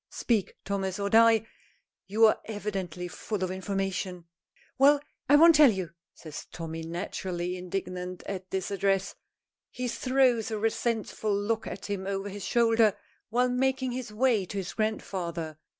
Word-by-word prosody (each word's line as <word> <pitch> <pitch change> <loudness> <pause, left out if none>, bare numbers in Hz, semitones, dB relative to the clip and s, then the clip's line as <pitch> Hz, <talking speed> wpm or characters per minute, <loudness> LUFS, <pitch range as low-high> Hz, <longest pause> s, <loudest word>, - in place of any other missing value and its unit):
Speak, 220 -5 -1
Thomas, 195 -1 -2
or 200 0 -1
die 225 -1 +6 0.6
you 215 +3 +5
are 215 - +4
evidently 195 -5 -4
full 200 +2 -4
of 185 - -1
information!" 190 -2 -3 0.5
"Well, 285 +2 +6 0.3
I 290 - +8
won't 330 +3 +8
tell 300 -3 +8
you!" 190 -7 -2 0.2
says 155 -2 -9
Tommy, 165 -1 -6
naturally 175 +1 -4
indignant 180 0 -5
at 190 -1 -5
this 190 +1 -3
address. 195 0 +1 0.6
He 250 0 -4
throws 250 -2 +2
a 220 - -2
resentful 220 -1 -1
look 225 +2 -1
at 180 +2 -6
him 195 -2 -3
over 200 0 -2
his 200 0 -7
shoulder 225 -2 +3 0.3
while 250 +3 +2
making 260 0 0
his 250 -2 -5
way 225 -2 +2
to 200 - -6
his 190 -1 -4
grandfather. 170 -7 -3
200 Hz, 150 wpm, -28 LUFS, 185-230 Hz, 0.6 s, I